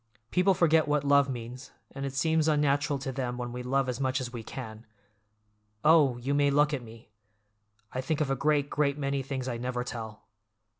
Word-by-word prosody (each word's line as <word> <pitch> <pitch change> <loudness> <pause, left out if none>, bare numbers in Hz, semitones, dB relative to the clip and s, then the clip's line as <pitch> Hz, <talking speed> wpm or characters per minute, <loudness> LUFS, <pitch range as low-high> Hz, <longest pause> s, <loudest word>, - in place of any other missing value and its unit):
People 185 +1 +3
forget 160 -2 +3
what 150 -1 +1
love 140 0 +4
means, 125 +1 -7 0.2
and 140 0 -4
it 135 - -7
seems 160 +2 +2
unnatural 145 -1 +2
to 135 0 -4
them 125 -2 -3
when 120 -1 -4
we 125 +1 -5
love 135 +2 0
as 125 0 -3
much 130 0 0
as 125 -1 -5
we 120 - -5
can. 110 -1 -8 1.0
Oh, 150 -5 +5
you 130 +4 -2
may 145 0 +3
look 145 +1 +3
at 135 - -2
me! 115 -2 -14 0.8
I 130 - -2
think 145 +3 -2
of 145 -3 0
a - - +2
great, 145 +1 +1
great 145 -1 0
many 140 -1 -1
things 130 -1 -4
I 120 -2 -2
never 125 0 -3
tell. 110 -3 -7
135 Hz, 200 wpm, -29 LUFS, 125-145 Hz, 1.0 s, Oh